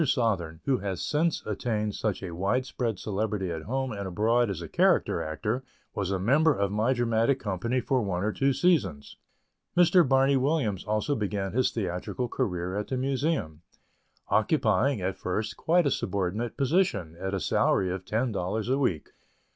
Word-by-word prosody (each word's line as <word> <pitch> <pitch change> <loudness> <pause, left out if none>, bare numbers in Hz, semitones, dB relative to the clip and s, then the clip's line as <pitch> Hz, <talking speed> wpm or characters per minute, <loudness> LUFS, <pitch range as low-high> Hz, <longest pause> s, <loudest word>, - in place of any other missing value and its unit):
Sothern, 100 - 0
who 135 -3 +2
has 95 -2 -3
since 160 +2 0
attained 105 -1 -2
such 105 -2 -2
wide 95 +8 -1
spread 120 -5 -2
celebrity 105 -2 -2
at 80 -1 -4
home 130 +8 -2
and 100 -2 -4
abroad 115 +5 +2
as 95 -4 -3
a 85 - -6
character - - +2
actor, 105 +11 -2 0.3
was 95 -2 -2
a 100 - 0
member 140 - +3
of 100 0 0
my 110 +5 +1
dramatic 120 +1 +2
company 115 +3 -1
for 130 0 +1
one 95 -4 -2
or 105 - +1
two 135 0 +2
seasons. 125 - +1 0.6
Mr. 180 +1 +6
Barney 135 +1 +4
Williams 130 - 0
also 110 +7 0
began 100 -5 -2
his 130 +2 +2
theatrical 100 +4 -3
career 90 -4 -2
at 105 0 -2
the 130 - -2
Museum, 135 - -1 0.7
occupying, 110 -1 +2
at 95 +1 -2
first, 105 +3 -2
quite 175 +6 +2
a 140 - +2
subordinate 100 +4 -2
position, 130 - +1
at 95 +1 -2
a - - -1
salary 95 0 +2
of 95 0 -4
ten 115 +6 -1
dollars 105 +3 -2
a 135 +2 +2
week. 90 - -1
110 Hz, 170 wpm, -27 LUFS, 95-130 Hz, 0.7 s, Mr